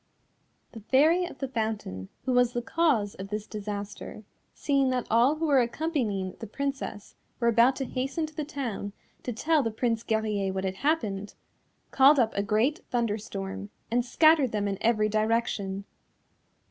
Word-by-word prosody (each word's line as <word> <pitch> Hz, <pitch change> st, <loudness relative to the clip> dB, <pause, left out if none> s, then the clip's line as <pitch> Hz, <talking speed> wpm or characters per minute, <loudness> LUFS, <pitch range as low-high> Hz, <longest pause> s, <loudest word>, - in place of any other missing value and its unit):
The 225 Hz, -, -9 dB
Fairy 305 Hz, -, +3 dB
of 350 Hz, -, -9 dB
the 270 Hz, -, -3 dB
Fountain, 215 Hz, -, -3 dB, 0.2 s
who 260 Hz, -, 0 dB
was 245 Hz, -1 st, +3 dB
the 240 Hz, -, -1 dB
cause 255 Hz, -11 st, +1 dB
of 190 Hz, -, -7 dB
this 210 Hz, 0 st, -3 dB
disaster 205 Hz, 0 st, -6 dB, 0.3 s
seeing 275 Hz, -2 st, +1 dB
that 255 Hz, -1 st, -1 dB
all 240 Hz, +6 st, +4 dB
who 320 Hz, +1 st, -2 dB
were 280 Hz, -4 st, +4 dB
accompanying 235 Hz, -, -2 dB
the 225 Hz, -, -6 dB
Princess 270 Hz, -4 st, -4 dB, 0.3 s
were 235 Hz, -, +1 dB
about 235 Hz, +3 st, +5 dB
to 270 Hz, -, -3 dB
hasten 270 Hz, +6 st, -2 dB
to 310 Hz, -, -11 dB
the 305 Hz, -, -2 dB
town 240 Hz, -9 st, -4 dB, 0.3 s
to 250 Hz, -, -4 dB
tell 300 Hz, +7 st, +2 dB
the 230 Hz, -, -1 dB
Prince 225 Hz, 0 st, -1 dB
Guerrier 215 Hz, -4 st, -1 dB
what 190 Hz, 0 st, -2 dB
had 190 Hz, 0 st, -3 dB
happened, 205 Hz, -10 st, -1 dB, 0.6 s
called 275 Hz, +2 st, +6 dB
up 230 Hz, -4 st, +2 dB
a 200 Hz, -, +1 dB
great 220 Hz, -, +1 dB
thunderstorm 205 Hz, -5 st, -3 dB, 0.2 s
and 240 Hz, +1 st, +2 dB
scattered 300 Hz, 0 st, +4 dB
them 205 Hz, -1 st, -1 dB
in 195 Hz, -1 st, -3 dB
every 215 Hz, -2 st, +3 dB
direction. 215 Hz, -2 st, -1 dB
230 Hz, 165 wpm, -28 LUFS, 205-270 Hz, 0.6 s, called